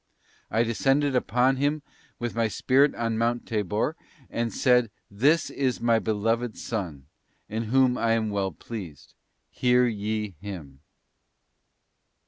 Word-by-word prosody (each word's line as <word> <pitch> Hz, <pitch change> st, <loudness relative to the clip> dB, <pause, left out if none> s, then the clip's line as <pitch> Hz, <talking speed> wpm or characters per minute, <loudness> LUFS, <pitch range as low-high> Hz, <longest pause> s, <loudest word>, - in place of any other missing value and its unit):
I 115 Hz, -, +2 dB
des 115 Hz, 0 st, -1 dB
cended 135 Hz, +3 st, +2 dB
upon 125 Hz, +1 st, +2 dB
Him 145 Hz, +2 st, 0 dB, 0.3 s
with 120 Hz, -1 st, -3 dB
My 115 Hz, -1 st, +1 dB
Spirit 135 Hz, +6 st, +3 dB
on 115 Hz, -1 st, -1 dB
Mount 120 Hz, +1 st, 0 dB
Tabor 105 Hz, -, -1 dB, 0.4 s
and 115 Hz, 0 st, -1 dB
said, 125 Hz, -3 st, +3 dB, 0.2 s
'This 140 Hz, +11 st, +2 dB
is 130 Hz, -3 st, -1 dB
My 115 Hz, -1 st, +3 dB
Beloved 115 Hz, +2 st, -1 dB
Son, 85 Hz, -, -4 dB, 0.4 s
in 110 Hz, +2 st, -3 dB
whom 125 Hz, +2 st, +3 dB
I 115 Hz, -1 st, +2 dB
am 110 Hz, -2 st, 0 dB
well 100 Hz, -2 st, -1 dB
pleased, 90 Hz, -4 st, -9 dB, 0.4 s
hear 125 Hz, 0 st, +3 dB
ye 105 Hz, -2 st, -2 dB
Him. 80 Hz, -10 st, -8 dB
115 Hz, 130 wpm, -26 LUFS, 105-125 Hz, 0.4 s, Spirit